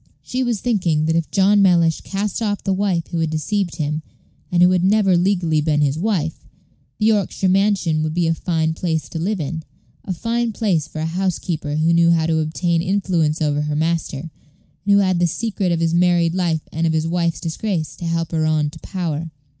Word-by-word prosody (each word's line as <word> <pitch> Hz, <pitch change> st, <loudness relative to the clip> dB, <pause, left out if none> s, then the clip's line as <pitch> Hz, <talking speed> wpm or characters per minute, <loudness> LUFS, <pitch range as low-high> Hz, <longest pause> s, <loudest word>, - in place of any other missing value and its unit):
She 255 Hz, -, -3 dB
was 240 Hz, -5 st, -1 dB
thinking 175 Hz, -10 st, +1 dB
that 160 Hz, +1 st, +1 dB
if 165 Hz, -1 st, 0 dB
John 200 Hz, +1 st, +4 dB
Mellish 170 Hz, -4 st, +3 dB
cast 200 Hz, +2 st, -3 dB
off 205 Hz, -2 st, -1 dB
the 195 Hz, -, 0 dB
wife 190 Hz, -4 st, -1 dB
who 170 Hz, -, -2 dB
had 160 Hz, -1 st, 0 dB
deceived 175 Hz, +4 st, -1 dB
him, 155 Hz, -1 st, -2 dB, 0.5 s
and 175 Hz, 0 st, +4 dB
who 180 Hz, -, +6 dB
had 180 Hz, -1 st, +2 dB
never 195 Hz, -1 st, +3 dB
legally 175 Hz, -4 st, +1 dB
been 150 Hz, -1 st, +1 dB
his 145 Hz, +1 st, +1 dB
wife, 175 Hz, -6 st, -1 dB, 0.5 s
the 215 Hz, -, 0 dB
Yorkshire 205 Hz, -3 st, +1 dB
mansion 190 Hz, -4 st, +2 dB
would 155 Hz, 0 st, -2 dB
be 175 Hz, -1 st, +1 dB
a 165 Hz, -, +2 dB
fine 160 Hz, -1 st, -1 dB
place 160 Hz, -2 st, -2 dB
to 165 Hz, -, -5 dB
live 195 Hz, +4 st, -1 dB
in; 160 Hz, +2 st, -3 dB, 0.4 s
a 195 Hz, -, -5 dB
fine 230 Hz, +5 st, -1 dB
place 180 Hz, -9 st, 0 dB
for 155 Hz, -, -6 dB
a -, -, -1 dB
housekeeper 165 Hz, -3 st, -2 dB
who 160 Hz, +2 st, +2 dB
knew 170 Hz, 0 st, +4 dB
how 165 Hz, -1 st, +3 dB
to 160 Hz, -1 st, +1 dB
obtain 165 Hz, +2 st, 0 dB
influence 175 Hz, -4 st, 0 dB
over 145 Hz, -1 st, +1 dB
her 150 Hz, 0 st, -2 dB
master, 160 Hz, -3 st, -1 dB
and 165 Hz, +1 st, -9 dB, 0.6 s
who 200 Hz, -, +6 dB
had 185 Hz, -3 st, +2 dB
the 175 Hz, -, +3 dB
secret 200 Hz, 0 st, -2 dB
of 165 Hz, -1 st, 0 dB
his 165 Hz, 0 st, +1 dB
married 175 Hz, -1 st, +3 dB
life 170 Hz, -4 st, 0 dB
and 165 Hz, +2 st, 0 dB
of 160 Hz, -, +1 dB
his 160 Hz, 0 st, 0 dB
wife's 170 Hz, -1 st, 0 dB
disgrace 165 Hz, -3 st, -3 dB
to 175 Hz, -, -6 dB
help 165 Hz, -1 st, -1 dB
her 160 Hz, -1 st, 0 dB
on 155 Hz, -1 st, +1 dB
to 160 Hz, -, -12 dB
power. 165 Hz, -3 st, -4 dB
170 Hz, 210 wpm, -20 LUFS, 160-190 Hz, 0.6 s, who